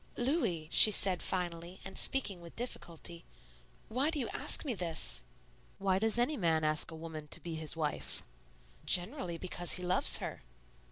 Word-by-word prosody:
"Louis," 240 Hz, -, -1 dB
she -, -, +8 dB
said 190 Hz, -3 st, +2 dB
finally 175 Hz, -1 st, -4 dB
and 195 Hz, 0 st, -9 dB
speaking 205 Hz, -10 st, +2 dB
with 170 Hz, -1 st, -13 dB
difficulty, 170 Hz, -8 st, -5 dB, 0.6 s
"why 260 Hz, +7 st, 0 dB
do 320 Hz, -, -3 dB
you 255 Hz, -, -3 dB
ask -, -, +1 dB
me 265 Hz, -, -1 dB
this?" 170 Hz, -, +2 dB, 0.6 s
"Why 190 Hz, -1 st, 0 dB
does 220 Hz, +2 st, 0 dB
any 260 Hz, +5 st, 0 dB
man 165 Hz, -4 st, +1 dB
ask 155 Hz, 0 st, 0 dB
a 160 Hz, -, -8 dB
woman 160 Hz, -2 st, -8 dB
to -, -, -6 dB
be 170 Hz, -, -7 dB
his 155 Hz, -1 st, -3 dB
wife?" 150 Hz, -2 st, -4 dB, 0.6 s
"Generally 180 Hz, -, +1 dB
because 175 Hz, 0 st, -2 dB
he 180 Hz, -, 0 dB
loves 180 Hz, +1 st, +6 dB
her." -, -, -6 dB
180 Hz, 165 wpm, -32 LUFS, 165-220 Hz, 0.6 s, she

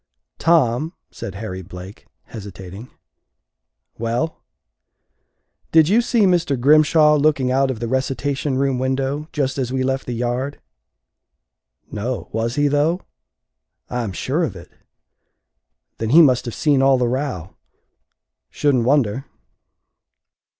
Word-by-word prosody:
"Tom," 155 Hz, -1 st, +2 dB, 0.2 s
said 95 Hz, +2 st, -7 dB
Harry 95 Hz, -3 st, -6 dB
Blake, 90 Hz, +2 st, -11 dB, 0.2 s
hesitating. 100 Hz, +1 st, -10 dB, 1.1 s
"Well?" 120 Hz, +8 st, -2 dB, 1.3 s
"Did 160 Hz, -1 st, +5 dB
you 220 Hz, +5 st, +4 dB
see 235 Hz, -1 st, +1 dB
Mr. 175 Hz, -8 st, +2 dB
Grimshaw 150 Hz, +2 st, +5 dB
looking 140 Hz, -3 st, +2 dB
out 135 Hz, +1 st, +2 dB
of 125 Hz, -4 st, -3 dB
the 120 Hz, -, -3 dB
recitation 135 Hz, +2 st, -1 dB
room 135 Hz, -2 st, 0 dB
window 135 Hz, +3 st, -1 dB
just 140 Hz, -3 st, -1 dB
as 125 Hz, -2 st, -2 dB
we 130 Hz, 0 st, -1 dB
left 135 Hz, +1 st, -2 dB
the 120 Hz, -, -3 dB
yard?" 125 Hz, +4 st, -2 dB, 1.3 s
"No 120 Hz, +4 st, -4 dB
was 115 Hz, +2 st, -2 dB
he, 145 Hz, 0 st, +2 dB
though?" 150 Hz, +5 st, +1 dB, 0.9 s
"I 125 Hz, -, -1 dB
am 110 Hz, -4 st, -3 dB
sure 90 Hz, -, -1 dB
of -, -, -3 dB
it." -, -, -12 dB, 1.3 s
"Then 110 Hz, -, -2 dB
he 165 Hz, +7 st, +8 dB
must 130 Hz, -4 st, +3 dB
have 120 Hz, -, -5 dB
seen 145 Hz, -4 st, +2 dB
all 135 Hz, 0 st, +4 dB
the 125 Hz, -1 st, +1 dB
row." 125 Hz, -, -3 dB, 0.9 s
"Shouldn't 130 Hz, -5 st, +1 dB
wonder." 130 Hz, -2 st, +1 dB
130 Hz, 125 wpm, -20 LUFS, 115-145 Hz, 1.3 s, he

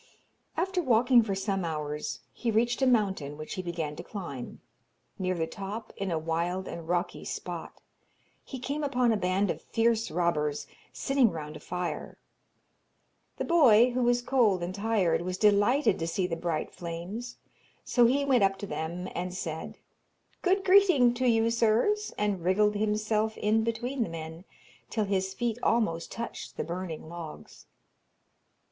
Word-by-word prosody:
After 370 Hz, +2 st, 0 dB
walking 245 Hz, -2 st, +5 dB
for 205 Hz, -3 st, -2 dB
some 195 Hz, -1 st, -1 dB
hours 150 Hz, -2 st, -3 dB
he 240 Hz, -, -2 dB
reached 235 Hz, +3 st, +1 dB
a 265 Hz, -, +4 dB
mountain, 190 Hz, -, +1 dB
which 155 Hz, 0 st, -6 dB
he 185 Hz, -, -3 dB
began 165 Hz, -4 st, -4 dB
to -, -, -6 dB
climb. 155 Hz, -, -7 dB, 0.6 s
Near 185 Hz, -1 st, 0 dB
the 165 Hz, -2 st, 0 dB
top, 200 Hz, +6 st, -7 dB
in 195 Hz, -1 st, -3 dB
a 165 Hz, -, 0 dB
wild 170 Hz, +4 st, -2 dB
and 165 Hz, -1 st, -7 dB
rocky 175 Hz, +1 st, -1 dB
spot, -, -, -6 dB, 0.6 s
he 265 Hz, -, -7 dB
came 280 Hz, +4 st, -3 dB
upon 250 Hz, -4 st, +2 dB
a -, -, +3 dB
band 190 Hz, 0 st, +1 dB
of -, -, -6 dB
fierce 230 Hz, 0 st, +1 dB
robbers, 150 Hz, -4 st, 0 dB, 0.3 s
sitting 270 Hz, -4 st, +2 dB
round 155 Hz, -3 st, -6 dB
a -, -, -8 dB
fire. 180 Hz, 0 st, -4 dB, 1.2 s
The -, -, -2 dB
boy, 250 Hz, -8 st, +6 dB
who 250 Hz, +1 st, -1 dB
was 245 Hz, 0 st, +2 dB
cold 225 Hz, -9 st, +2 dB
and 175 Hz, +2 st, -3 dB
tired, 200 Hz, -5 st, +1 dB
was 180 Hz, +1 st, -3 dB
delighted 210 Hz, +8 st, +3 dB
to 165 Hz, -, -2 dB
see 185 Hz, +2 st, 0 dB
the 175 Hz, -2 st, -2 dB
bright 165 Hz, -2 st, -3 dB
flames, 180 Hz, +8 st, -6 dB, 0.5 s
so 240 Hz, -2 st, +4 dB
he 280 Hz, +3 st, +2 dB
went 255 Hz, -6 st, +4 dB
up 195 Hz, 0 st, +2 dB
to 205 Hz, -, -5 dB
them 175 Hz, 0 st, -4 dB
and 180 Hz, +1 st, -4 dB
said, 160 Hz, -3 st, -5 dB, 0.6 s
'Good 385 Hz, +1 st, +2 dB
greeting 365 Hz, -11 st, +6 dB
to 255 Hz, +1 st, 0 dB
you, 225 Hz, -1 st, +3 dB
sirs,' 235 Hz, -, +2 dB
and 205 Hz, -4 st, -1 dB
wriggled 210 Hz, +4 st, +3 dB
himself 215 Hz, +1 st, 0 dB
in 220 Hz, +1 st, +2 dB
between 240 Hz, +3 st, -2 dB
the 225 Hz, -, 0 dB
men, 165 Hz, +2 st, -7 dB, 0.4 s
till 215 Hz, -2 st, 0 dB
his 190 Hz, -1 st, -1 dB
feet 240 Hz, -1 st, -1 dB
almost 190 Hz, -8 st, +1 dB
touched 235 Hz, 0 st, -6 dB
the -, -, -1 dB
burning 170 Hz, -2 st, -5 dB
logs. 165 Hz, -2 st, -9 dB
205 Hz, 160 wpm, -29 LUFS, 175-240 Hz, 1.2 s, boy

